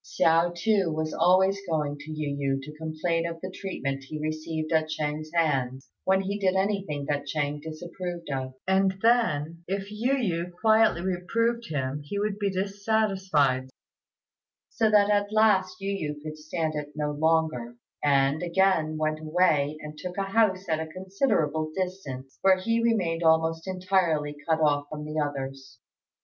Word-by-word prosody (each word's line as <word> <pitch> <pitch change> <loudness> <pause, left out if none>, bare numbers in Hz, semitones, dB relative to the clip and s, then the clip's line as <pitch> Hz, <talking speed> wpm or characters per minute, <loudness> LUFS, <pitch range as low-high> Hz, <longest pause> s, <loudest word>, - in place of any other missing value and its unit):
Hsiao, 165 +1 +3
too, 195 -2 +2
was 155 0 -2
always 190 +2 +4
going 150 -3 0
to 150 +2 -9
Yu 150 -2 -3
yü 135 -1 0
to 150 +2 -9
complain 160 +2 -1
of 165 -1 -6
the 185 +2 -6
treatment 135 -9 -4
he 155 +2 -6
received 155 +1 -3
at 160 -1 +2
Ch'êng's 155 0 -3
hands 135 -6 0
when 190 0 +3
he 200 +2 -3
did 190 -1 +2
anything 190 -7 -1
that 145 0 -2
Ch'êng 145 -1 -2
disapproved 170 +2 -6
of; 130 -1 -3
and 190 0 +3
then, 170 -9 +2
if 195 +2 -3
Yu 235 +6 0
yü 180 -9 -1
quietly 220 -5 +4
reproved 230 +6 0
him, 140 -1 -2
he 145 +8 -5
would 205 0 -1
be 200 -1 +1
dissatisfied, 190 -9 +1 1.0
so 225 -2 +2
that 210 -1 +5
at 205 0 +1
last 215 -3 +3
Yu 195 0 -2
yü 150 -6 -3
could 155 0 -6
stand 155 0 -2
it 150 -1 -5
no 150 -1 -1
longer, 155 -6 +1 0.3
and 140 +1 +3
again 175 -3 +2
went 155 0 0
away 155 -2 +2
and 150 0 -9
took 180 0 -6
a 195 - +1
house 195 -1 +2
at 160 -1 0
a 160 - -3
considerable 175 - 0
distance, 160 -9 -5
where 190 -1 +5
he 230 +5 0
remained 185 -8 +1
almost 160 +1 +2
entirely 180 -6 +1
cut 160 0 +3
off 145 -1 +2
from 150 -1 -6
the 155 +1 -3
others. 135 -3 -4
165 Hz, 160 wpm, -27 LUFS, 150-195 Hz, 1.0 s, that